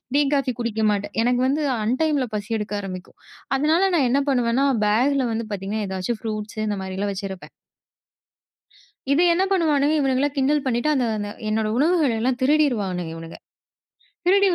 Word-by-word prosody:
Tea, 290 - +5
coffee 270 -2 0
குடிக்க 220 -2 -2
மாட்டேன். 205 0 -3
எனக்கு 245 0 +2
வந்து 290 +3 0 0.2
அன்டைம் 290 +7 +1
ல - - -3
பசி 210 +2 -5
எடுக்க 210 0 -5
ஆரம்பிக்கும். 185 -2 -8 0.4
அதனால 315 +6 +2
நான் 270 -6 +3
என்ன 280 +2 +3
பண்ணுவேன்னா, 250 +1 +2 0.2
பேக் 245 +7 +2
ல 245 - -1
வந்து 225 0 -2
பார்த்தீங்கன்னா, 205 +2 -3
ஏதாச்சும் 190 +4 -3
ஃப்ரூட்ஸு, 215 0 -5
இந்த 205 -1 -1
மாரிலாம் 195 +2 -3
வச்சிருப்பேன். 190 -1 -7 1.6
இது 300 +5 +4
என்ன 370 +3 +2
பண்ணுவானுங்க! 305 -4 +2
இவனுங்களா 270 +1 +1
கிண்டல் 280 +2 +2
பண்ணிட்டு, 240 +3 0
அந்த 255 -3 +1
அந்த 205 0 -4 0.2
என்னோட 215 0 0
உணவுகள 315 -2 +3
எல்லாம் 250 +1 0
திருடிருவானுங்க. 220 - +1
இவனுங்க! 165 0 -9 0.9
திருடி 395 +1 +5
245 Hz, 155 wpm, -23 LUFS, 205-285 Hz, 1.6 s, Tea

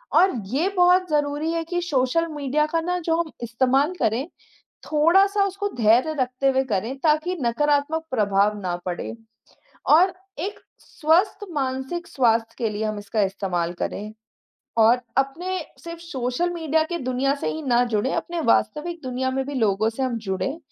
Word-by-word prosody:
और 380 +1 +6 0.2
ये 310 +7 +2
बहुत 360 0 +4
ज़रूरी 295 +1 0
है 330 0 -1
कि 350 +2 -2
सोशल 315 0 +1
मीडिया 295 +1 0
का 330 - +2
ना, 360 +2 -1
जो 330 -1 0
हम 325 -2 -6
इस्तेमाल 260 +7 +2
करें, 230 +7 0 0.6
थोड़ा-सा 385 +7 +4
उसको 395 +1 -2
धैर्य 240 +7 +4
रखते 255 +1 +1
हुए 265 0 +2
करें, 220 +7 -1
ताकि 310 +4 +1
नकारात्मक 290 +5 +1
प्रभाव 210 -3 +2
ना 180 -2 -2
पड़े, 180 +5 -4 0.7
और 360 +5 +6 0.3
एक 395 +6 -4 0.2
स्वस्थ 345 +7 +1
मानसिक 265 +4 -3
स्वास्थ्य 230 -3 +1
के 230 - 0
लिए 210 +1 -3
हम 215 -1 -2
इसका 205 +1 -1
इस्तेमाल 190 -3 -1
करें। 210 +1 -4 0.7
और 235 +3 +5 0.2
अपने 335 +8 0 0.2
सिर्फ़ 335 -1 -7
सोशल 270 0 -2
मीडिया 320 -2 +1
की 345 - -2
दुनिया 255 +2 +1
से 280 - -4
ही 315 - -5
ना 245 -3 +3
जुड़े, 235 +2 0
अपने 345 0 -3
वास्तविक 300 +7 +1
दुनिया 260 0 -2
में 265 0 -1
भी 285 - -5
लोगों 215 -2 +2
से 230 +4 -4
हम 250 -3 -1
जुड़े 190 +10 -2
275 Hz, 160 wpm, -23 LUFS, 230-330 Hz, 0.7 s, और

